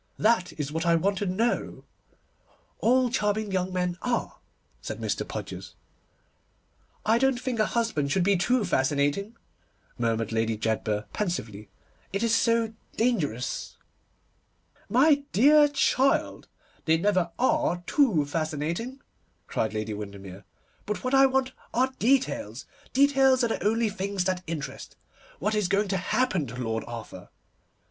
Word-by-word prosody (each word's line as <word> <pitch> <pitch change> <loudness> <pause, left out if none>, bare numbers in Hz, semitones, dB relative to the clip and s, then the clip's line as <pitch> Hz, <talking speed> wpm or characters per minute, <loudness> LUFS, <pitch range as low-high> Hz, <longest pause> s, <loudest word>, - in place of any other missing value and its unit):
That 215 -5 +2
is 145 -2 -4
what 160 +1 -2
I 170 -1 +4
want 195 +4 +1
to 205 - -1
know.' 220 +6 -1 1.0
'All 250 +1 +3
charming 210 -3 0
young 185 0 -1
men 180 -1 -2
are,' 245 -1 -2 0.4
said - - -6
Mr. - - -2
Podgers. - - -7 1.3
'I 225 +2 +4
don't 265 -1 +2
think 250 -3 -3
a 215 - +3
husband 220 -12 -1
should 190 +1 +2
be 200 +2 +3
too 215 +5 +1
fascinating,' 145 - 0 0.6
murmured 115 -2 0
Lady 115 0 0
Jedburgh 110 -1 -1
pensively, 110 - -3 0.4
'it 200 +3 -1
is 230 -1 +2
so 230 -1 +2 0.2
dangerous.' 155 - -1 1.1
'My 285 +4 +4
dear 295 +7 +6
child, 275 -1 +1 0.4
they 160 0 +4
never 185 -1 +1
are 260 - +1
too 225 - +3
fascinating,' 160 - -3 0.4
cried 110 - -1
Lady 110 0 -2
Windermere. 100 -2 -8 0.4
'But 210 - -3
what 255 +1 -2
I 270 0 +7
want 265 0 0 0.2
are 260 +2 +2
details. 230 - 0 0.3
Details 270 -1 +4
are 235 - +2
the - - -2
only 225 +2 +2
things 200 -2 -2
that 185 0 -1
interest. 145 -5 -6 0.4
What 210 +5 -1
is 210 -3 +1
going 200 +2 +1
to 190 - +1
happen 190 - 0
to 120 - -8
Lord 115 -3 -2
Arthur? 115 -6 -8
195 Hz, 140 wpm, -27 LUFS, 145-240 Hz, 1.3 s, I